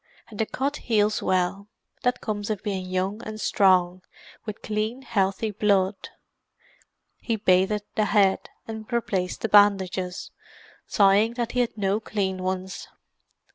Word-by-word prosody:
And 210 - -11
the 220 - +1
cut 280 +3 -2
heals 215 -2 +1
well; 185 +2 0 0.3
that 250 0 0
comes 205 -1 -3
of 210 -3 -3
being 190 -3 -3
young 185 +4 -2
and 215 0 -7
strong, 185 -3 +3 0.5
with 215 - -6
clean, 215 +5 -2
healthy 205 -2 0
blood." 195 -1 +1 1.1
He 230 - -1
bathed 200 0 +2
the 215 - +1
head, 200 -2 +2 0.2
and 220 +1 -7
replaced 195 -6 -1
the - - 0
bandages, 190 -3 +3 0.6
sighing 205 +3 +4
that 240 -1 -2
he 250 - -1
had 240 -2 0
no 200 +1 +1
clean 190 -4 -2
ones. 185 0 -4
205 Hz, 135 wpm, -25 LUFS, 190-220 Hz, 1.1 s, sighing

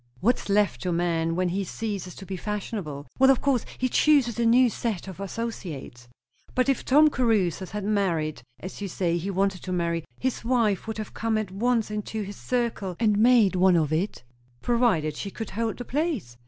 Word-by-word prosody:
"What's 235 +2 +1
left 200 -11 +2
to 180 - -2
a - - 0
man 165 -1 0
when 180 0 +1
he 195 +3 -1
ceases 195 -2 -5
to 195 - -10
be 190 - -5
fashionable?" 190 - -4
"Well, 265 0 +6
of 270 - +5
course 265 -5 +1
he 255 - +1
chooses 255 -4 +3
a 235 - +3
new 250 +2 +6
set 220 -5 -3
of 190 -1 -8
associates." 185 - -6 0.5
"But 255 +2 +2
if 270 - +1
Tom 300 +3 +5
Caruthers 200 - +1
had 210 -1 -4
married 170 - 0 0.2
as 185 +2 -8
you 200 - -2
say 175 -2 0
he 180 +4 -3
wanted 195 -1 0
to 185 - -6
marry, 170 -2 -1 0.2
his 260 -1 -2
wife 230 -5 +1
would 220 - -4
have 215 -1 -6
come 225 -1 0
at 215 -4 -3
once 225 +2 0
into 210 +1 -3
his 200 +1 -7
circle, 235 -7 -2
and 210 -3 +2
made 225 -4 +5
one 185 0 +5
of 155 -2 +1
it?" 170 -3 -2 0.4
"Provided 225 -12 +2
she 200 - -5
could 225 +1 -7
hold 225 +2 -2
the 245 - -6
place." 275 - -2
205 Hz, 200 wpm, -26 LUFS, 180-235 Hz, 0.5 s, Well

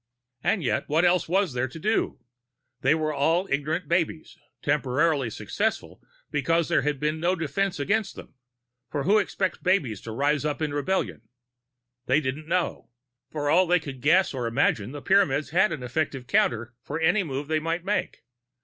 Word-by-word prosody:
And 200 -6 +1
yet 130 - -1
what 160 +4 +3
else 175 -1 +2
was 190 -4 +1
there 125 +1 0
to 130 - -10
do? 215 +7 0 0.6
They - - +4
were 155 -1 -1
all 165 +7 +1
ignorant 155 +4 -1
babes, 165 -1 -1 0.3
temporarily 145 -1 +1
successful - - -3 0.3
because 165 +3 +1
there - - +3
had 145 -2 -1
been 150 +2 -1
no 175 +3 +1
defense 185 +2 -1
against 200 +7 0
them, - - -11 0.6
for 145 - -2
who 205 +7 +4
expects 190 -2 -2
babes 145 - 0
to 115 - -7
rise 145 +5 +1
up 150 -1 -2
in 155 -2 -2
rebellion? 145 - -2 0.8
They 130 +4 +4
didn't 150 +2 -4
know. 180 +1 -1 0.4
For 145 -1 -3
all 175 +5 +4
they 180 +1 +4
could 140 -5 -8
guess 175 +6 +4
or 125 -3 -2
imagine, 115 -3 +1
the 145 0 -8
Pyramids 155 -8 +2
had 190 +5 +3
an 150 -6 -4
effective 130 0 -2
counter 120 -2 +1
for 145 +4 -4
any 175 +6 +3
move 140 -4 -4
they 155 0 +1
might 165 +2 -3
make. 195 -2 -2
155 Hz, 175 wpm, -26 LUFS, 140-175 Hz, 0.8 s, They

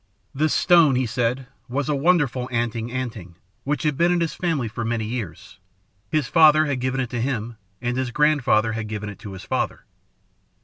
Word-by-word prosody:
"This 150 +3 +1
stone, 170 -6 +5
he 130 0 +1
said, 120 +3 -1 0.2
was 135 +2 -2
a 150 - +1
wonderful 140 -5 +1
'anting 115 -1 -2
anting' 115 -9 -5 0.3
which 150 +3 -2
had 150 -3 0
been 170 +1 +3
in 175 - +2
his 165 -2 -1
family 160 -9 -1
for 115 +2 -5
many 115 -1 -1
years. 100 -4 -6 0.5
His 155 -4 0
father 155 -2 +6
had 140 -4 -1
given 130 +1 -1
it 125 -3 -2
to 120 -2 -2
him, 120 -3 -3 0.3
and 120 0 -1
his 130 -1 -1
grandfather 125 -6 +2
had 110 -1 -4
given 105 -1 -5
it 100 - -10
to 100 - -8
his 95 - -9
father. - - -2
125 Hz, 190 wpm, -23 LUFS, 115-150 Hz, 0.5 s, father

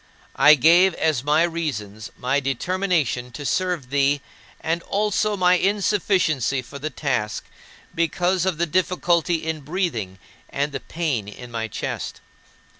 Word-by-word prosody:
I 150 +3 +7
gave 170 +6 +5
as 155 -6 0
my 150 +3 +3
reasons 125 -12 -3
my 135 +3 +1
determination 145 -2 -1
to 145 +3 -7
serve 175 -6 -1
thee 140 0 +2 0.4
and 165 +1 -1
also 210 +2 0
my 180 -1 +4
insufficiency 185 - +1
for 140 +3 -10
the 155 +2 -3
task, 120 -9 -2 0.5
because 170 +3 +1
of 185 -4 0
the 170 - +1
difficulty 175 -1 +1
in 160 -1 -2
breathing 140 - -3 0.3
and 145 +1 -1
the 135 - -4
pain 150 -11 -2
in 120 +4 -10
my 115 -1 -3
chest. - - -5
155 Hz, 135 wpm, -23 LUFS, 135-180 Hz, 0.5 s, I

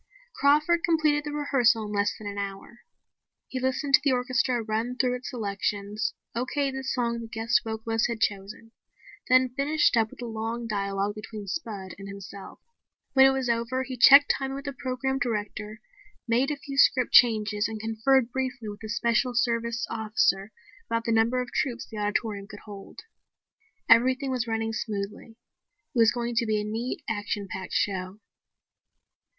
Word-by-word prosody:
Crawford 300 +4 +3
completed 305 -3 +2
the 295 - -4
rehearsal 270 -6 +2
in 210 - -6
less 205 0 +1
than 215 - -11
an 205 0 -4
hour. 200 +4 -6 0.7
He 260 - -3
listened 260 +2 -1
to - - +8
the 280 -3 +3
orchestra 250 -1 0
run 225 +3 -2
through 250 -1 +1
its 250 - -6
selections, 205 -2 -3 0.2
okayed 270 +3 -1
the 265 0 -5
song 235 -3 -1
the 230 - -7
guest 225 +1 +1
vocalist 225 0 -1
had 235 -2 -4
chosen, 205 +2 -3 0.6
then 255 -1 +4
finished 295 0 +2
up 225 -1 +2
with - - -15
a - - -3
long 225 +1 -4
dialogue 200 -2 -2
between 215 0 -8
Spud 200 - -5
and 195 - -8
himself. 200 0 -10 0.6
When 265 -1 +7
it - - +4
was 265 -1 -1
over 235 +2 0
he 260 0 -6
checked 280 +3 +8
timing 270 0 -4
with 275 +1 -7
the 280 - -4
program 265 +1 -2
director, 215 -2 -3 0.5
made 240 +4 +2
a 300 - -1
few 275 -1 -5
script 255 -2 +4
changes 215 -3 +5
and 220 -1 -6
conferred 225 +3 +1
briefly 255 -4 -3
with 205 0 -9
a 220 - -6
Special 235 +2 +1
Service 235 -1 0
Officer 215 -2 +1 0.4
about 230 0 0
the 230 - -1
number 225 +3 +2
of 245 - -12
troops 245 -5 -1
the 215 - -7
auditorium 205 -1 -2
could 205 -1 -11
hold. 200 -2 -11 0.9
Everything 260 +4 +4
was 245 -2 -1
running 225 0 -2
smoothly. 215 +1 -5 0.6
It 245 - 0
was 225 -1 +6
going 240 0 -3
to 235 -2 +2
be 215 -1 +1
a - - -2
neat, 225 +4 -4
action 205 -2 -3
packed 190 -1 -7
show. 190 0 -1
230 Hz, 170 wpm, -27 LUFS, 210-255 Hz, 0.9 s, to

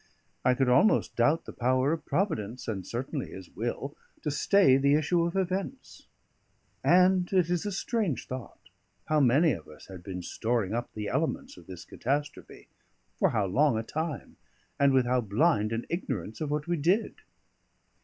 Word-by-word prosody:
I 125 - +3
could 135 -1 +1
almost 205 - +3
doubt 130 +7 +2
the - - -9
power 130 +4 +1
of 165 - -6
Providence 125 - -2
(and 100 -5 -4
certainly 130 +4 -4
His 95 -2 -10
will) 120 +5 -4 0.3
to 150 - -1
stay 150 0 +4
the 140 +1 +3
issue 165 +3 +2
of 170 - -5
events; 195 +7 -3 0.8
and 180 0 +4
it 180 -3 +2
is 175 +3 0
a - - -2
strange 195 - -1
thought, 130 -2 -9 0.4
how 155 0 +3
many 145 +5 +4
of 85 - -5
us 75 -1 -14
had 95 -2 -9
been 90 -1 -6
storing 110 0 -1
up 120 +1 -3
the 105 -1 -4
elements 155 +4 -2
of 90 -1 -16
this 90 -2 -9
catastrophe, 145 +4 -4 0.5
for - - +4
how 105 -3 0
long 125 +6 +2
a 110 - -2
time, 155 +3 -5 0.4
and 140 -1 +5
with 130 -2 +3
how 125 +1 +2
blind 110 - +1
an 115 +1 -2
ignorance 130 - -4
of 155 - -2
what 150 0 -1
we 175 0 -1
did. 180 +9 +1
140 Hz, 175 wpm, -28 LUFS, 115-170 Hz, 0.8 s, and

